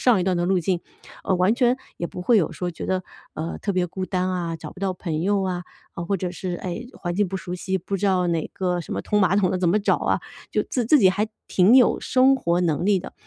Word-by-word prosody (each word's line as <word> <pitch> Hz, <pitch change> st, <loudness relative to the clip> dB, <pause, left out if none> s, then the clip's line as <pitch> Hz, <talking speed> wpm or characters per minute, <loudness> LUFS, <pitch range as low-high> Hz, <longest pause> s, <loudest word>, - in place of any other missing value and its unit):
上 240 Hz, -6 st, +4 dB
一 -, -, 0 dB
段 185 Hz, -2 st, +1 dB
的 175 Hz, 0 st, 0 dB
路 190 Hz, -1 st, +3 dB
径， 175 Hz, 0 st, 0 dB, 0.4 s
哦 190 Hz, -, +2 dB
完 185 Hz, +5 st, +3 dB
全 245 Hz, 0 st, +3 dB, 0.2 s
也 170 Hz, -, -2 dB
不 180 Hz, -, -7 dB
会 230 Hz, +3 st, +4 dB
有 165 Hz, -, +1 dB
说 180 Hz, -1 st, -4 dB
觉 165 Hz, -, -7 dB
得， 185 Hz, -1 st, 0 dB, 0.3 s
呃， 160 Hz, +2 st, -4 dB
特 205 Hz, -, -2 dB
别 180 Hz, -1 st, +1 dB
孤 185 Hz, +2 st, -5 dB
单 185 Hz, -1 st, -1 dB
啊， 170 Hz, -2 st, -2 dB
找 -, -, -9 dB
不 190 Hz, -, -14 dB
到 190 Hz, -2 st, -1 dB
朋 160 Hz, -4 st, -3 dB
友 200 Hz, +1 st, +1 dB
啊， 180 Hz, -1 st, -2 dB, 0.3 s
呃 170 Hz, -, -4 dB
或 195 Hz, -, +1 dB
者 180 Hz, 0 st, -3 dB
是， 180 Hz, 0 st, -4 dB
哎， 185 Hz, +7 st, -5 dB
环 175 Hz, -1 st, -4 dB
境 205 Hz, -1 st, +1 dB
不 190 Hz, -, -3 dB
熟 180 Hz, -1 st, -5 dB
悉， 190 Hz, +1 st, -2 dB
不 190 Hz, +2 st, -3 dB
知 205 Hz, -, 0 dB
道 185 Hz, -2 st, +2 dB
哪 165 Hz, -2 st, -1 dB
个 180 Hz, -2 st, -1 dB
什 -, -, -6 dB
么 -, -, -3 dB
通 210 Hz, 0 st, +1 dB
马 190 Hz, +1 st, +3 dB
桶 190 Hz, -3 st, +3 dB
的 185 Hz, -, -1 dB
怎 180 Hz, -2 st, +2 dB
么 205 Hz, +5 st, +3 dB
找 200 Hz, -, +2 dB
啊， -, -, 0 dB, 0.3 s
就 -, -, +1 dB
自 245 Hz, -4 st, -2 dB
自 300 Hz, +3 st, +6 dB
己 190 Hz, -5 st, +6 dB
还 210 Hz, +3 st, -1 dB, 0.2 s
挺 200 Hz, +7 st, +5 dB
有 250 Hz, -, +5 dB
生 265 Hz, +1 st, +4 dB
活 175 Hz, -8 st, 0 dB
能 170 Hz, +2 st, 0 dB
力 200 Hz, -2 st, +4 dB
的。 180 Hz, -, -8 dB
185 Hz, 295 characters per minute, -23 LUFS, 175-200 Hz, 0.4 s, 自